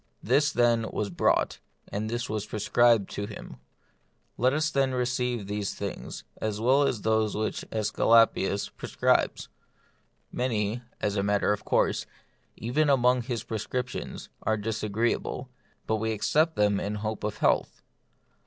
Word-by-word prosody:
This, 140 +6 +3
then, 120 -2 +2
was 100 -2 -3
brought, 85 - +1 0.3
and 105 +2 -3
this 120 +1 -2
was 105 -1 -3
prescribed 115 0 +3
to 100 - -4
him. 105 - -9 0.8
Let 125 +2 +3
us, 155 +3 0
then, 135 -2 +1
receive 125 -3 -1
these 105 0 -3
things, - - -6
as 105 -1 -2
well 135 +5 +4
as 115 -6 -2
those 110 -1 +1
which 110 0 -2
^Esculapius 110 -1 +3
pre - - -7
scribes. - - +1 0.8
Many, 115 -2 -1 0.2
as 105 0 0
a - - +2
matter 100 +1 +2
of 105 - -6
course, - - +1 0.5
even 145 +6 0
among 125 -2 +4
his 120 -2 -3
prescriptions, 125 +3 -4
are 110 - +1
disagreeable, 110 +4 -2 0.3
but 110 - 0
we 110 +1 -1
accept 155 +9 +2
them 105 -1 +2
in 105 +1 -3
hope 110 +1 -4
of 105 0 -2
health. - - +1
110 Hz, 145 wpm, -27 LUFS, 105-125 Hz, 0.8 s, well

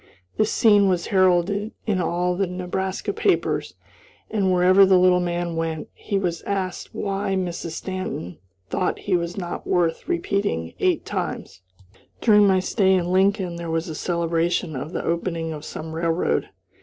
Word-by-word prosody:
This 215 0 +1
scene 205 -4 +5
was 180 -2 0
heralded 190 +3 +2
in 200 -5 +1
all 180 +1 0
the 195 +1 0
Nebraska 185 - -3
papers, 405 -3 0 0.6
and, 195 -4 +1
wherever 185 +2 +6
the 190 -1 +6
little 180 0 +5
man 175 -1 -2
went, 165 -1 -3
he 200 - -3
was 175 -4 -2
asked 190 -3 -4
why 195 -1 -1
Mrs. 175 -3 -3
Stanton 185 - -5 0.3
thought 185 - -1
he 195 - -1
was 170 +1 -2
not 175 -3 -5
worth 170 - 0
repeating 200 - -1
eight - - +1
times. 90 - -4 0.6
During 210 -3 +5
my 190 -1 +4
stay 190 0 +2
in 180 -1 0
Lincoln 190 -2 +2
there 170 -1 -5
was 165 0 -1
a - - -4
celebration 170 0 -1
of 140 +5 -5
the - - -4
opening 165 -1 -2
of 150 -1 -8
some 160 +1 -7
railroad. 165 +1 0
180 Hz, 155 wpm, -23 LUFS, 170-195 Hz, 0.6 s, wherever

